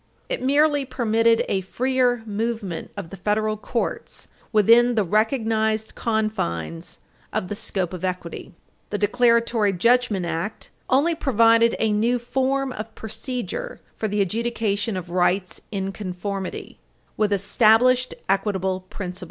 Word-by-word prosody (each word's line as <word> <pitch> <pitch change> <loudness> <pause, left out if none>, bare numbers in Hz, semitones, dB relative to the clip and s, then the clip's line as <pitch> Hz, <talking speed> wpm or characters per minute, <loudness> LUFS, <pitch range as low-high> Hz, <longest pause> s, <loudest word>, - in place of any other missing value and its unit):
It - - -2
merely 290 +2 +3
permitted 230 -3 +2
a 190 - 0
freer 245 +4 0
movement 215 -4 -3
of 185 -5 -6
the 195 - -8
federal 215 +3 0
courts 230 +2 -4 0.2
within 230 +3 +5
the 215 - +3
recognized 220 +1 +1
confines 85 - -2 0.3
of 180 - -2
the 205 - -3
scope 190 -3 -3
of 180 -1 -7
equity. 180 -1 -4 0.3
The 205 - -2
Declaratory 230 -1 +2
Judgment 230 -1 +2
Act 170 +5 -4 0.2
"only 290 +6 +3
provided 230 -6 +4
a 220 -1 +1
new 230 +4 +2
form 265 +2 -1
of 220 -2 -7
procedure 260 - -5 0.2
for 220 - -2
the 205 0 0
adjudication 215 0 -1
of 175 -1 -7
rights 180 +1 0
in 195 -2 -2
conformity" 195 0 -5 0.4
with 210 -1 +1
"established 225 +5 +3
equitable 190 -1 0
principles." 185 -3 -6
220 Hz, 125 wpm, -23 LUFS, 195-240 Hz, 0.4 s, within